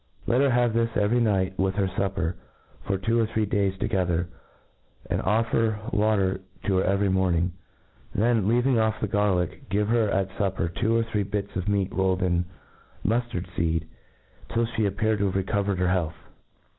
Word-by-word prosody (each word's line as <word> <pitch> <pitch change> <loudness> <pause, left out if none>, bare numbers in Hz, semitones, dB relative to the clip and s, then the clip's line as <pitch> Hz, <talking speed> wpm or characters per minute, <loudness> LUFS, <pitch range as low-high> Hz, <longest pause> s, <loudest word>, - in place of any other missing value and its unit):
Let 125 +3 +2
her 140 - +4
have 120 -2 +2
this 115 0 +2
every 105 +4 +2
night 95 -4 +1
with 95 0 +1
her 100 -1 +1
fupper, 95 -2 -1 0.5
for 100 - +1
two 115 +5 +1
or 115 - +2
three 110 -1 0
days 100 -1 0
together, 90 -4 0 0.8
and - - -1
offer 110 +1 +1 0.2
water 105 -3 +2 0.2
to 95 -2 +1
her - - +3
c - - -1
very 100 +1 +2
morning. 90 -2 +1 0.6
Then, 110 -1 +2
leaving 120 +2 +3
off 110 0 +1
the - - 0
garlick, 95 -4 0
give 105 +2 +1
her 115 -2 +3
at 95 -1 0
fupper 95 -4 0
two 115 +5 +1
or 115 - +2
three 110 -2 -1
bits 100 0 -3
of 95 +2 -2
meat 100 -2 0
rolled 95 -1 +1
in 90 -1 +1 0.6
muftard 115 -3 0
feed, 80 -2 -1 0.6
till 115 0 +1
flic 115 -2 0
appear 110 +2 0
to 100 - 0
have 95 - -1
recovered 100 0 0
£cr 90 0 +1
health. 85 -4 0
100 Hz, 180 wpm, -26 LUFS, 95-110 Hz, 0.8 s, her